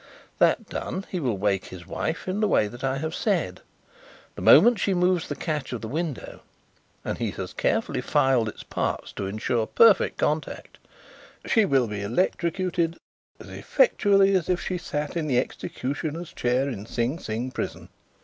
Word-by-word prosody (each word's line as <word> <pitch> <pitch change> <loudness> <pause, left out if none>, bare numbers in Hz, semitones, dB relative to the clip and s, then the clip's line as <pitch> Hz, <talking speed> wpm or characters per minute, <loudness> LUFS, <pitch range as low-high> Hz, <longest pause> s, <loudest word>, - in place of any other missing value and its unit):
That - - +3
done, 190 +1 -4
he 185 - -2
will 125 -9 -1
wake 100 -1 0
his 90 -2 -10
wife 160 - -3
in 185 +2 -1
the 215 - +2
way 105 - +3
I 135 0 0
have 160 +3 -3
said. - - -1 0.7
The - - -9
moment 240 -3 +7
she 195 -1 +1
moves 180 -1 +2
the - - -4
catch 150 -6 -3
of 120 - -4
the 110 - -5
window 155 +1 -4 0.7
and - - -3
he - - -1
has - - -6
carefully - - 0
filed 125 -4 +2
its - - -10
parts - - -3
to 100 - -4
ensure 110 +2 -1
perfect 225 -4 +5
contact 150 +1 -2 0.7
she 220 -2 +3
will 135 -7 +3
be 105 -2 -5
electrocuted 170 - 0 0.4
as - - -11
effectually 200 - +3
as 185 -3 +1
if 180 -1 +2
she 180 -1 -3
sat 150 -2 -4
in 165 -2 -1
the 130 -4 +1
executioner's 145 +6 -3
chair 125 +3 +1
in 110 -6 -5
Sing 120 +8 -1
Sing 115 +4 -4
prison." - - -5
150 Hz, 170 wpm, -25 LUFS, 120-180 Hz, 0.7 s, moment